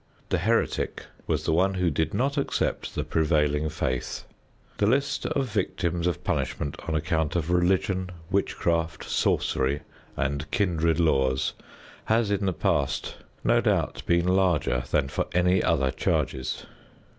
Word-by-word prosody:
The - - +1
heretic - - 0 0.2
was - - 0
the - - +1
one 95 +4 +2
who 90 -2 +1
did 80 +2 0
not 135 +7 0
accept 140 - -1
the - - -1
prevailing 75 -1 +1
faith. 65 -4 -3 0.6
The 100 - +3
list 140 +4 +1
of 135 - 0
victims 90 -4 -1
of 90 - -2
punishment 70 -1 -2
on 80 - 0
account 80 0 0
of 85 0 0
religion, 95 +1 +1 0.2
witchcraft, 85 -4 0
sorcery 70 +3 +1 0.4
and 70 +3 -2
kindred 85 -5 +1
laws 65 -5 +2 0.5
has 110 -1 +2
in 100 -1 0
the - - +2
past 70 -4 -1 0.3
no - - +4
doubt - - 0
been 85 0 +3
larger 90 -9 +2
than 70 -2 +2
for - - -2
any 90 +1 +4
other 70 -5 +2
charges. 65 0 -1
85 Hz, 140 wpm, -26 LUFS, 75-95 Hz, 0.6 s, no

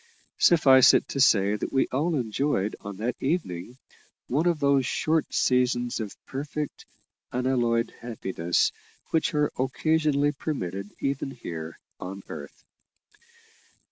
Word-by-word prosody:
Suffice 135 -6 +7
it - - +1
to 140 - -3
say 105 -6 +4
that - - -4
we 135 - +3
all 155 +6 0
enjoyed 115 -3 -1
on 100 -1 -7
that 115 +4 -2
evening 125 - -2 0.5
one 150 +7 +1
of 170 -3 +1
those 140 -2 +3
short 155 +4 0
seasons 125 -1 +1
of 105 -3 -5
perfect, 145 +2 -5 0.4
unalloyed 120 -2 0
happiness 95 -7 -1 0.4
which 160 -1 +1
are 150 0 +2
occasionally 145 +2 +1
permitted 100 - -4
even 140 0 -1
here 85 -11 -7 0.2
on 95 +2 -7
earth. - - -9
130 Hz, 120 wpm, -26 LUFS, 105-145 Hz, 0.5 s, Suffice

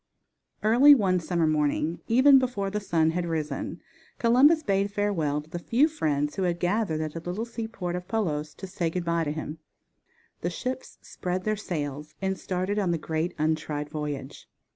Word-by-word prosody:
Early 250 +7 +8
one 190 -7 +2
summer 170 0 0
morning, 155 +1 +1
even 265 +4 +7
before 215 -7 -2
the 210 - -1
sun 165 -5 +1
had 175 +1 -2
risen, 155 -4 -3 0.4
Columbus 275 +7 +5
bade 195 -2 +1
farewell 165 -8 0
to 155 - -21
the 175 - -4
few 245 - +3
friends 150 - -1
who - - -1
had 175 -2 0
gathered 180 -3 0
at 155 -1 -3
the 165 - -4
little 180 +7 -3
seaport 220 -7 -4
of 180 0 -6
Palos 155 -9 -2
to - - -8
say 180 -3 -2
good 175 +1 -3
bye 170 -1 +1
to 145 - -1
him. 155 0 -5 0.8
The - - -1
ships 260 0 -5
spread 180 +1 -4
their 215 +2 0
sails 150 -7 -5
and 190 0 -1
started 185 +2 -2
on 195 -3 0
the 170 - +1
great 160 +2 -2
untried 150 -1 -1
voyage. 150 -3 -5
180 Hz, 180 wpm, -27 LUFS, 155-210 Hz, 0.8 s, Early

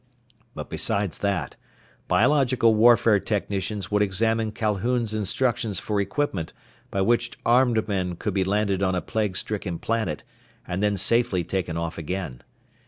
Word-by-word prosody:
But - - -6
besides 100 -4 -1
that, 95 -9 -2 0.5
biological 130 -6 +3
warfare 115 -1 +5
technicians 100 -2 -3
would 105 0 +2
examine 110 +3 +1
Calhoun's 110 +2 -1
instructions 110 0 0
for 105 -2 -1
equipment 100 - -2 0.4
by 95 - -1
which 120 +4 +1
armed 120 -2 +3
men 95 -4 -1
could 105 +3 -3
be 95 -1 +1
landed 100 0 0
on 95 -1 +1
a 90 - -1
plague 105 -4 -1
stricken 100 -5 -3
planet 110 -9 -2 0.4
and 90 +2 -2
then 105 -1 +1
safely 95 -2 +2
taken 85 -1 -3
off 85 0 -4
again. 85 -6 -5
105 Hz, 140 wpm, -25 LUFS, 95-115 Hz, 0.5 s, warfare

